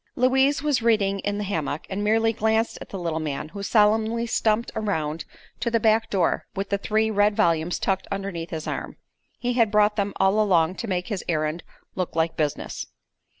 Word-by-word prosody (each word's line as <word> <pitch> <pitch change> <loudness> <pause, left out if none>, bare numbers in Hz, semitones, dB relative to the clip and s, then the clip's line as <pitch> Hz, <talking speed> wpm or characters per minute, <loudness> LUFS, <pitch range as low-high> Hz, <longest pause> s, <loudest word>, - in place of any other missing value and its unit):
Louise 265 +3 +3
was 290 -5 +1
reading 205 -4 +2
in 205 +1 -2
the 210 - -2
hammock, 160 -7 -3
and 195 +2 -3
merely 225 +2 +2
glanced 220 +1 +1
at - - -9
the 195 - -5
little 165 -3 -2
man, 150 -1 -4
who 200 +5 -8
solemnly 220 +3 +2
stumped 225 0 +1
around 160 -7 -2 0.3
to 235 - 0
the 230 0 +2
back 220 +1 +2
door 185 -4 0
with 195 0 -3
the 200 - +2
three 220 +2 +1
red 205 0 +3
volumes 165 -1 +1
tucked 190 0 -1
underneath 195 -4 -4
his 160 -2 -5
arm. - - -5 0.4
He 245 0 -1
had 230 -3 +3
brought 210 0 +3
them 200 -1 0
all 195 +3 +3
along 180 -3 +2
to 230 - -4
make 180 -1 -2
his 205 -4 -3
errand 155 0 -1 0.3
"look 185 -3 -3
like 165 0 +1
business." 150 -2 -3
205 Hz, 195 wpm, -24 LUFS, 175-220 Hz, 0.4 s, Louise